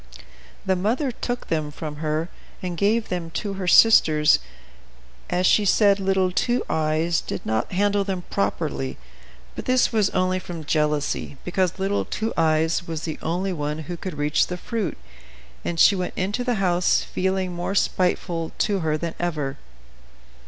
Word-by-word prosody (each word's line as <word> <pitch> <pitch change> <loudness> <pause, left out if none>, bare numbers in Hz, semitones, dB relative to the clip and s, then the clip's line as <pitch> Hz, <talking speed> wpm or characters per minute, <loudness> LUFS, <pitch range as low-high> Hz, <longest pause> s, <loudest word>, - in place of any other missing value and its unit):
The 190 - +2
mother 230 +9 0
took 245 +1 -4
them 155 -2 -1
from 150 0 -7
her, 155 +1 -1 0.4
and 180 -1 -3
gave 215 +6 +1
them 175 -2 -3
to 205 -2 -2
her 190 -2 -4
sisters, 155 -7 +6 0.9
as 180 +1 +1
she 210 - +5
said 200 0 +4
little 190 -1 +1
Two 240 +6 +1
Eyes 160 +2 +1
did - - -6
not 110 +1 -1
handle 200 +2 +2
them 190 -2 -3
properly, 70 -9 -2 0.6
but - - -6
this 255 -1 +2
was 210 -3 +3
only 185 0 0
from 175 -3 -7
jealousy, 150 -2 0
because 180 0 0
little 195 +1 0
Two 220 +1 -3
Eyes 160 +1 +1
was 160 -2 -4
the 160 - -4
only 180 +4 -1
one 150 -2 -3
who 175 +4 -5
could 175 -2 -6
reach 145 +1 +2
the 180 - -4
fruit, 205 -3 -3 0.7
and 170 -1 -3
she 200 - +7
went 180 -1 -3
into 205 +6 -1
the 245 -1 0
house 180 -3 +2
feeling 190 -1 -1
more 175 +3 -3
spiteful 175 -3 0
to 200 -2 +1
her 155 -2 0
than 165 +1 -4
ever. 150 -5 -2
180 Hz, 160 wpm, -23 LUFS, 155-195 Hz, 0.9 s, she